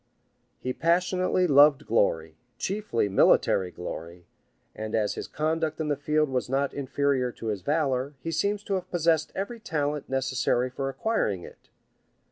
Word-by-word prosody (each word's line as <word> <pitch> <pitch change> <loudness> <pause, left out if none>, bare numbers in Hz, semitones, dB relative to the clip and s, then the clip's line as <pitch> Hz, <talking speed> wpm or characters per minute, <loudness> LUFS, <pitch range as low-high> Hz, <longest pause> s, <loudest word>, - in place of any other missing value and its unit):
He 130 - -3
passionately 180 +3 +1
loved 145 -1 +6
glory, 80 -8 +1 0.2
chiefly 195 - -1
military 95 -1 +3
glory; 85 0 -8 0.5
and 110 0 -4
as 105 -2 +1
his - - -6
conduct 160 +1 -1
in 155 -1 -1
the 145 - +2
field 150 +2 +1
was 130 -1 -2
not 135 +1 0
inferior 140 -2 0
to 115 - -5
his 105 -3 -2
valor, 140 - 0
he 165 - -4
seems 200 +5 0
to 200 - -3
have 185 -1 -2
possessed 165 -2 +1
every 215 +5 -4
talent 150 -7 -2
necessary 130 -1 0
for 135 +1 -3
acquiring 135 - -1
it. - - -14
140 Hz, 150 wpm, -27 LUFS, 125-165 Hz, 0.5 s, loved